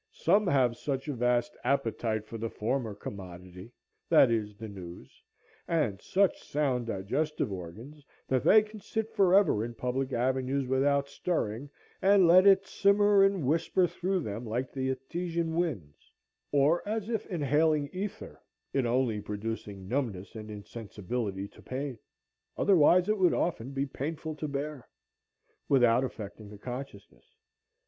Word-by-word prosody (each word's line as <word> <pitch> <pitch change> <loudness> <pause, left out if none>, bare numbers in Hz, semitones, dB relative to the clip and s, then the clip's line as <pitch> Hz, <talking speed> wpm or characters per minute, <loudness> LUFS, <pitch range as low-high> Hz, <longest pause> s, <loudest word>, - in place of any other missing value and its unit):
Some 200 +4 +2
have 125 -7 +2
such 135 0 -3
a 145 - -2
vast 120 -1 0
appetite 115 -5 0
for 115 +1 -8
the 115 +1 -3
former 115 -1 -2
commodity, 90 0 -9 0.4
that 125 - +6
is, 105 -3 -2
the 110 0 -7
news, 90 -4 -11 0.5
and 135 -13 0
such 195 0 +1
sound 130 -5 -1
digestive 115 +7 -2
organs, 110 - -8 0.2
that 130 -1 +1
they 215 0 +7
can 215 0 -11
sit 220 +2 -3
forever 190 - +4
in 120 0 -6
public 130 +3 -2
avenues 130 +2 0
without 140 +2 +2
stirring, 140 -5 -2 0.3
and 195 -1 +5
let 185 +3 +7
it 195 0 +6
simmer 200 0 +4
and 195 -6 +2
whisper 165 +5 +2
through 185 +2 -1
them 110 -3 -5
like 120 +3 -3
the 130 -1 -2
Etesian 165 +5 -3
winds, 135 - -3 0.4
or 145 +4 +3
as 215 -1 -2
if 225 -3 -2
inhaling 150 -2 +1
ether, 195 +2 -6 0.3
it 130 -3 +1
only 120 -3 +1
producing 105 -2 -5
numbness 110 -6 -3
and 110 -1 -8
insensibility 105 -1 -5
to - - -18
pain,—otherwise 145 - 0
it 215 -1 +1
would 180 -2 +4
often 135 -8 -1
be 135 0 -2
painful 155 +3 -5
to 150 0 -5
hear,—without 140 -3 -2
affecting 105 -4 -7
the 105 - -11
consciousness. 125 -2 -9
135 Hz, 140 wpm, -29 LUFS, 110-165 Hz, 0.5 s, they